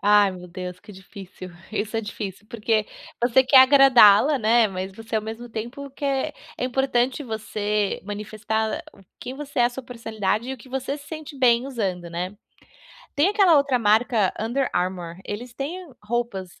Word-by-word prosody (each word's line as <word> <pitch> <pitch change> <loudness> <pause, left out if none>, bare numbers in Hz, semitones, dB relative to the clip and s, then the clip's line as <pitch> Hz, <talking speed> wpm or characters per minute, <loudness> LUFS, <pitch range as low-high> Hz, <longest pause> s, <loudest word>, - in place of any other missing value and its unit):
Ai, 205 -1 +5
meu 180 -1 -9
Deus, 180 0 -7
que 210 -1 -14
difícil. 190 -1 -11 0.2
Isso 215 +1 -2
é - - +1
difícil, 205 -1 -7
porque 215 -1 0 0.3
você 245 +2 +4
quer 265 +1 +6
agradá-la, 265 -1 +7
né, 225 0 +4
mas 190 0 -5
você, 225 +2 -5
ao 215 - -1
mesmo 225 +2 -7
tempo, 240 +5 -6
quer 275 -1 -2 0.2
é - - -2
importante 260 +1 0
você 210 -2 -2
manifestar 215 +1 -3
o - - -19 0.2
que 255 - -7
você 285 -1 -7
é, - - +6
a - - +4
sua 265 +2 -7
personalidade 225 -2 -3
e - - -2
o - - -6
que 255 +3 -16
você 265 +2 -3
se 290 0 -14
sente 310 -2 -8
bem 245 -1 +3
usando, 190 -9 -3
né. 180 +4 -5 0.8
Tem 300 +6 +3
aquela 395 -6 +5
outra 275 -3 +1
marca 220 -1 +2
Under 245 +4 -1
Armour, 175 -1 -2
eles 235 +4 -6
têm 285 +8 -4 0.2
roupas 215 -5 -3
e - - -25
225 Hz, 175 wpm, -24 LUFS, 205-265 Hz, 0.8 s, agradá-la